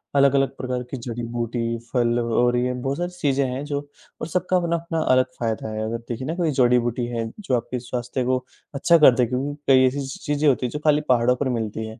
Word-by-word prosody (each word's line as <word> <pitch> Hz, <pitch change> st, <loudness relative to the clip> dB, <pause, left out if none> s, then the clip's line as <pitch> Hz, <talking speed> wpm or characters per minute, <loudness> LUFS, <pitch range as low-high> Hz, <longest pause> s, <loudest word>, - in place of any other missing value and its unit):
अलग-अलग 140 Hz, 0 st, +3 dB
प्रकार 125 Hz, -1 st, -3 dB
की 135 Hz, -, -3 dB
जड़ी-बूटी, 115 Hz, 0 st, -3 dB, 0.2 s
फल 120 Hz, -1 st, +2 dB
और 120 Hz, +1 st, +2 dB
ये 125 Hz, +1 st, 0 dB
बहुत 135 Hz, +3 st, -3 dB
सारी 175 Hz, +1 st, -3 dB
चीजें 140 Hz, -3 st, +1 dB
हैं 130 Hz, +2 st, -4 dB
जो 145 Hz, -1 st, -2 dB, 0.4 s
और -, -, -3 dB
सबका 180 Hz, +2 st, 0 dB
अपना-अपना 170 Hz, -1 st, -1 dB
अलग 130 Hz, -2 st, +3 dB
फ़ायदा 110 Hz, -2 st, -2 dB
है, 110 Hz, -, -3 dB
अगर 115 Hz, +1 st, -2 dB
देखिए 120 Hz, +2 st, -6 dB
ना 165 Hz, -, -2 dB
कोई 170 Hz, -4 st, 0 dB
जड़ी-बूटी 120 Hz, -2 st, +2 dB
है, 115 Hz, -2 st, -3 dB
जो 185 Hz, -11 st, 0 dB
आपके 120 Hz, +2 st, -4 dB
स्वास्थ्य 125 Hz, +1 st, -3 dB
को 130 Hz, 0 st, 0 dB, 0.3 s
अच्छा 170 Hz, +5 st, +4 dB
कर 140 Hz, -6 st, +7 dB
दें, 125 Hz, -2 st, +2 dB
क्योंकि 135 Hz, +4 st, -2 dB, 0.2 s
कई 130 Hz, 0 st, +6 dB
ऐसी-ऐसी 135 Hz, 0 st, -4 dB
चीज़ें 150 Hz, +1 st, +1 dB
होती 125 Hz, -1 st, +1 dB
हैं 120 Hz, -, -3 dB
जो 150 Hz, -, -4 dB
खाली 150 Hz, 0 st, +4 dB
पहाड़ों 125 Hz, 0 st, +4 dB
पर 130 Hz, +1 st, -2 dB
मिलती 110 Hz, -2 st, -3 dB
हैं। 110 Hz, +1 st, -10 dB
125 Hz, 215 wpm, -23 LUFS, 120-140 Hz, 0.4 s, कर